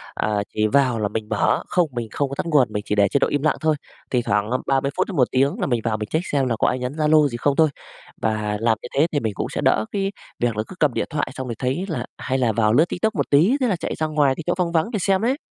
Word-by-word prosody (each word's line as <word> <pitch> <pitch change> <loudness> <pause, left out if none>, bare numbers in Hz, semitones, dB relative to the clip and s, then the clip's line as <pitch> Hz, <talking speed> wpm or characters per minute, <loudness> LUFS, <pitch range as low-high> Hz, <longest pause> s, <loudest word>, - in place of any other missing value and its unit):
à, 110 - -1 0.2
chỉ 110 0 +1
vào 125 -2 +2
là 105 - 0
mình 110 +1 -5
mở 110 - +1
không, 175 -3 +1
mình 120 -2 -4
không 140 -2 -1
có 140 - -5
tắt - - -3
nguồn, 150 -6 +3
mình 105 - -2
chỉ 105 - -1
để 100 -1 +4
chế 140 - +1
độ - - +3
im 145 - -1
lặng 155 - +2
thôi. 155 -1 +2 0.4
Thỉnh 125 - +2
thoảng 105 +1 +1 0.2
30 135 +1 +1
phút - - +1
đến - - -5
1 125 -3 +3
tiếng 135 +2 +1
là - - 0
mình 120 -3 0
vào 110 -2 0
mình 105 0 -5
check 160 +4 -1
xem 135 -3 +1
là 115 - 0
có - - +3
ai 125 - 0
nhắn 125 +1 -3
Zalo 155 -1 +4
gì 120 -3 -5
không 140 +3 +1
thôi. 160 -1 +4 0.5
Và 105 -1 -1
làm 115 0 +2
như - - -7
thế 145 +4 +4
thì 145 - +1
mình 110 -5 -2
cũng - - -3
sẽ - - -3
đỡ 110 - +2
cái 195 0 -1 0.3
việc 120 -3 0
là 110 - 0
cứ - - -10
cầm 145 -6 +3
điện - - -1
thoại, 150 -2 -2
xong 130 -1 -5
rồi 115 - -4
thấy 135 +9 -1
là 160 - -3
hay 130 -1 -2
là 120 -3 +2
vào 110 0 +2
lướt 155 +6 +5
Tiktok 220 +5 -1
một - - -1
tí, 165 - +5
thế 250 - +3
là 200 - +1
chạy 170 - -4
ra 155 - -1
ngoài 145 -3 +2
cái 165 - -6
chỗ 175 - +2
vắng 175 -2 0
vắng 170 +7 +1
để 210 - -1
xem 190 +1 +2
đấy. 255 +5 +1
135 Hz, 310 wpm, -22 LUFS, 115-160 Hz, 0.5 s, lướt